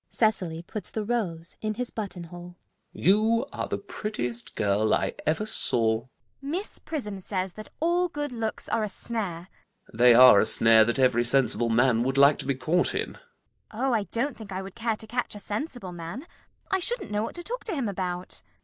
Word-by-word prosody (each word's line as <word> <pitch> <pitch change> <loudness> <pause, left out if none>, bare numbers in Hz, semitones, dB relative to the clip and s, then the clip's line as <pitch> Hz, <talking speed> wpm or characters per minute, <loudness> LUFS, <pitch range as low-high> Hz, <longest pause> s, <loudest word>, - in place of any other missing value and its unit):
[Cecily 180 -7 0
puts 210 +4 -6
the 220 - -3
rose 180 -8 -3
in 215 -1 -2
his 250 +1 -3
buttonhole.] 175 -4 -7 0.4
You 220 +5 +2
are - - -3
the - - -2
prettiest 125 - -4
girl 105 +1 +2
I - - -1
ever 160 +7 +1
saw. 115 - +1
CECILY. 120 - -21 0.3
Miss 330 +9 -5
Prism 210 -11 -5
says 185 -1 -3
that 215 - -10
all 345 +2 +2
good 295 -3 -4
looks 225 -2 -4
are 225 - 0
a 210 - -2
snare. 195 -7 -5
ALGERNON. - - -26 0.5
They 120 -1 +7
are 125 -4 +9
a - - +3
snare 115 -1 +7
that 120 +3 0
every 125 -3 +3
sensible 120 -1 +4
man 115 0 +3
would 135 +2 -1
like 140 +1 +6
to - - -5
be 140 - +1
caught 155 +8 0
in. - - -2
CECILY. - - -17 0.5
Oh, 255 +4 0
I 220 -3 +1
don't 245 +6 -2
think 215 -3 -11
I 190 0 -4
would 190 -1 -9
care 230 -1 -1
to 220 - -10
catch 240 0 -3
a - - -7
sensible 210 - -5
man. 175 - -7 0.5
I 385 - +2
shouldn't 475 - -2
know 210 0 0
what 225 - -5
to 345 - -6
talk - - -5
to 410 - -3
him 265 -6 -1
about. 180 -2 -4
195 Hz, 205 wpm, -26 LUFS, 140-230 Hz, 0.5 s, are